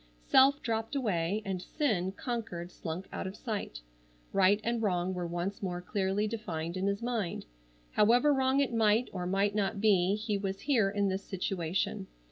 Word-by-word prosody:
Self 275 Hz, -, +5 dB
dropped 225 Hz, +3 st, -2 dB
away, 205 Hz, -5 st, 0 dB
and 190 Hz, -2 st, -2 dB
sin, 190 Hz, -, -1 dB
conquered, 200 Hz, -7 st, -4 dB
slunk 175 Hz, +2 st, -6 dB
out -, -, -3 dB
of 190 Hz, -, -6 dB
sight. 205 Hz, -, -4 dB, 0.5 s
Right 195 Hz, +1 st, +4 dB
and 235 Hz, 0 st, 0 dB
Wrong 185 Hz, -3 st, 0 dB
were 180 Hz, -1 st, -3 dB
once 175 Hz, +4 st, -3 dB
more 180 Hz, -3 st, -2 dB
clearly 195 Hz, +2 st, -1 dB
defined 175 Hz, -7 st, -4 dB
in 190 Hz, +1 st, -1 dB
his 200 Hz, +3 st, -1 dB
mind. 230 Hz, -, -2 dB, 0.5 s
However 245 Hz, +7 st, +4 dB
wrong 265 Hz, 0 st, +2 dB
it 270 Hz, -4 st, 0 dB
might 225 Hz, +1 st, +3 dB
or 180 Hz, -2 st, -3 dB
might 195 Hz, +2 st, +1 dB
not 200 Hz, -1 st, 0 dB
be 195 Hz, -2 st, +4 dB
he 210 Hz, -1 st, -2 dB
was 195 Hz, 0 st, -3 dB
here 235 Hz, -9 st, +3 dB
in 200 Hz, 0 st, +1 dB
this 190 Hz, +1 st, -2 dB
situation. 190 Hz, +2 st, -2 dB
200 Hz, 170 wpm, -31 LUFS, 185-225 Hz, 0.5 s, Self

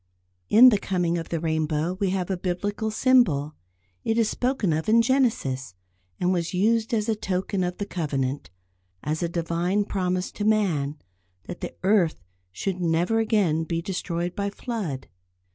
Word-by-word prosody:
In 245 Hz, +4 st, +9 dB
the 210 Hz, -4 st, +2 dB
coming 175 Hz, -3 st, 0 dB
of 165 Hz, -, -7 dB
the 165 Hz, -, -1 dB
rainbow 160 Hz, +1 st, 0 dB
we 200 Hz, -2 st, +1 dB
have 185 Hz, 0 st, -1 dB
a -, -, +1 dB
Biblical 200 Hz, +4 st, -2 dB
symbol. 215 Hz, -, +3 dB, 0.5 s
It 225 Hz, -, 0 dB
is 230 Hz, -2 st, +3 dB
spoken 245 Hz, -, 0 dB
of 160 Hz, +6 st, -1 dB
in 230 Hz, +1 st, +5 dB
Genesis, 220 Hz, -, 0 dB, 0.4 s
and 180 Hz, +1 st, +2 dB
was 170 Hz, 0 st, -2 dB
used 225 Hz, +5 st, +2 dB
as 215 Hz, -2 st, 0 dB
a 225 Hz, -, +2 dB
token 190 Hz, -1 st, -2 dB
of 180 Hz, 0 st, -3 dB
the 205 Hz, -, -3 dB
Covenant; 145 Hz, -7 st, -2 dB, 0.5 s
as 155 Hz, +3 st, -2 dB
a 170 Hz, -, 0 dB
Divine 175 Hz, +4 st, 0 dB
promise 185 Hz, -2 st, -1 dB
to 205 Hz, -, -5 dB
man, 175 Hz, -10 st, +1 dB, 0.5 s
that -, -, -8 dB
the -, -, -5 dB
earth 190 Hz, -5 st, +3 dB, 0.3 s
should 185 Hz, -, -3 dB
never 175 Hz, +6 st, +1 dB
again 200 Hz, -8 st, +2 dB
be 165 Hz, +1 st, -2 dB
destroyed 175 Hz, -1 st, -3 dB
by 200 Hz, 0 st, -1 dB
flood. 200 Hz, -, -5 dB
180 Hz, 160 wpm, -25 LUFS, 165-210 Hz, 0.5 s, In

